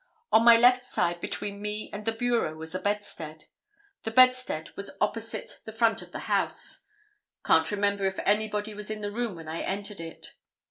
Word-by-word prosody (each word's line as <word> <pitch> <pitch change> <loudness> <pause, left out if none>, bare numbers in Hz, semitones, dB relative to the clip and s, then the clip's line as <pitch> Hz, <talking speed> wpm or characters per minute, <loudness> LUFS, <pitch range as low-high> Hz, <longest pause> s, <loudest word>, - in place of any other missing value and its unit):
On 220 - +6
my 235 0 +9
left 250 +2 +5
side 175 -7 -1
between 200 0 -4
me 210 +1 -3
and 205 +1 -6
the 225 - +2
bureau 230 -8 0
was 160 +1 -4
a 185 - -1
bedstead; 175 -6 -4 0.6
the - - -3
bedstead 255 -8 +3
was 200 - -5
opposite 225 +2 -3
the 220 - -6
front 225 0 +2
of - - -12
the - - -6
house; - - -1 0.6
can't 160 0 +4
remember 200 -1 0
if 190 0 -1
anybody 210 +1 0
was 210 0 -4
in 215 -1 -4
the 205 0 -3
room 230 -2 -2
when 165 -1 -10
I 160 +1 -4
entered 200 0 -4
it. 165 -1 -9
210 Hz, 185 wpm, -28 LUFS, 190-225 Hz, 0.6 s, my